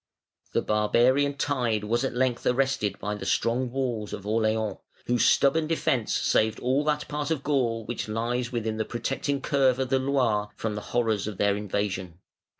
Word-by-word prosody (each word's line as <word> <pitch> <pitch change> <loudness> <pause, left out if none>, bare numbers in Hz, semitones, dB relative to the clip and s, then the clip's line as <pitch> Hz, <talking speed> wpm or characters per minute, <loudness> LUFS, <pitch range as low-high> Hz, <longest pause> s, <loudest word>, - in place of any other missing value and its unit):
The - - +1
barbarian 125 +7 +2
tide 120 -8 0
was 120 +4 0
at 135 - -2
length 125 -1 0
arrested 125 -6 +1
by 105 +2 -3
the 105 - -6
strong 115 +6 0
walls 120 -5 -3
of 100 - -6
Orleans, 110 0 0 0.3
whose 120 -1 +3
stubborn 155 +3 +3
defence 135 -8 0
saved 110 0 +2
all 130 +4 +1
that 150 -1 0
part 145 0 -3
of 155 -4 -1
Gaul 120 -6 0
which 120 - -4
lies 115 +3 -2
within 110 -2 -2
the 110 - 0
protecting 135 +3 -2
curve 135 -3 +2
of 130 -1 -2
the 135 0 +3
Loire 125 -6 +1
from 110 -1 -3
the 105 - -4
horrors 110 -4 0
of 105 -3 -5
their 100 -1 +2
invasion. 95 -4 -3
120 Hz, 175 wpm, -26 LUFS, 105-135 Hz, 0.3 s, whose